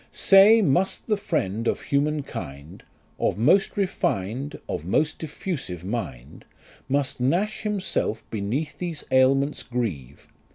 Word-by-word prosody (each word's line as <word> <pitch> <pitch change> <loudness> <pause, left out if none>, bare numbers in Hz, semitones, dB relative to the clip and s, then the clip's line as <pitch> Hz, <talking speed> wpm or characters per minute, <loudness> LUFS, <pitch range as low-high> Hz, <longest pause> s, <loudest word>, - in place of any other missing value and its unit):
" - - -35 0.2
Say, 210 +3 +8
must 180 +5 +1
the 215 - +1
friend 115 - -2
of - - 0
human 145 +1 0
kind, 70 - -8 0.4
Of - - 0
most 185 - +3
refin'd 140 - -1
of - - -3
most 150 - 0
diffusive 145 - -5
mind; 85 - -5 0.5
Must 140 -1 0
Nash 175 +12 0
himself 200 - -2
beneath 115 +9 -3
these 170 -4 -4
ailments 135 +2 +3
grieve 90 - -4
135 Hz, 125 wpm, -25 LUFS, -, 0.5 s, Say